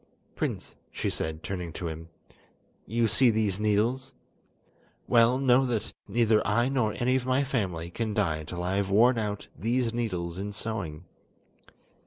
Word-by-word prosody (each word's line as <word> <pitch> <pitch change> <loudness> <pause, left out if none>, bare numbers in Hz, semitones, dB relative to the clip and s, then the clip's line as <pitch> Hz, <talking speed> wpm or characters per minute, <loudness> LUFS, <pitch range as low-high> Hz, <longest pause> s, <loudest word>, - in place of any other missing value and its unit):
"Prince," - - -3
she - - -2
said, 80 0 -4
turning 90 -3 -4
to 85 - -4
him, 80 +1 -7 0.8
"you 115 +2 +2
see 120 +4 +4
these 105 -3 +1
needles? 115 +6 +1 0.9
Well, 120 +1 +5
know 130 -1 +4
that 115 -4 -2
neither 110 0 +3
I 120 +5 +2
nor 125 -6 0
any 125 +1 +2
of 130 -1 -1
my 130 +2 +3
family 90 -11 -2
can 110 +1 -2
die 80 -7 0
till 90 +2 -5
I 95 +2 0
have 100 -1 0
worn 115 +5 +5
out 105 -2 -3
these 115 - 0
needles 90 -7 -2
in 105 +1 -4
sewing. 95 -7 -4
110 Hz, 155 wpm, -28 LUFS, 90-120 Hz, 0.9 s, Well